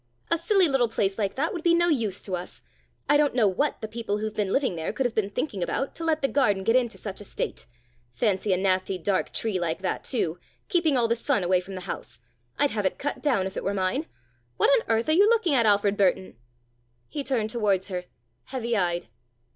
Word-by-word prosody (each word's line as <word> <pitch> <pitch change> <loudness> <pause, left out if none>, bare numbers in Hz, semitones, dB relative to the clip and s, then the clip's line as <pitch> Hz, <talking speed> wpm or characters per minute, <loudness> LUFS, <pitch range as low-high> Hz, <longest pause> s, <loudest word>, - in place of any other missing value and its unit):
"A 335 - +4
silly 385 +1 +4
little 270 -4 +2
place 200 -2 -1
like 200 -2 -1
that 310 +5 -1
would 345 - -4
be 340 +1 +4
no 345 0 +3
use 225 - 0
to 190 - -3
us. 180 0 -8 0.4
I 290 - +5
don't 290 -3 +2
know 230 -5 +4
what 240 +11 0
the 220 - -3
people 220 -2 -3
who've 215 0 -3
been 205 -3 -1
living 260 -8 +1
there 160 -1 -3
could 265 - -2
have 245 - 0
been 210 -3 0
thinking 205 -2 -3
about, 270 +10 -2
to 335 - -7
let 315 -2 0
the - - +4
garden 210 -9 +1
get 225 +4 +2
into 240 -3 +1
such 200 -1 -6
a - - -7
state. 195 - -5 0.4
Fancy 190 - 0
a 185 - +3
nasty 185 0 +1
dark 185 +2 -1
tree 215 -5 -1
like 170 +1 -2
that, 185 - -2
too, 180 - -1 0.3
keeping 340 -8 +2
all 235 -2 +3
the 230 - +2
sun 240 -3 0
away 180 +1 +2
from 190 +1 -9
the 185 - -6
house! 180 -9 -7 0.4
I'd 290 - +2
have 205 -3 +1
it - - -4
cut 290 - -3
down 245 -11 +1
if 190 - -5
it - - -4
were 200 +1 -1
mine. 195 - -1 0.5
What - - +4
on 230 - +3
earth 225 0 +1
are - - +2
you 395 +7 +5
looking 445 -9 +3
at, 235 -4 +4
Alfred 205 0 +3
Burton?" 190 -4 +1 0.7
He 290 - -4
turned 235 -6 -1
towards 205 -5 0
her, 180 -1 -4 0.4
heavy 235 -3 -2
eyed. 175 - 0
220 Hz, 235 wpm, -26 LUFS, 190-275 Hz, 0.7 s, I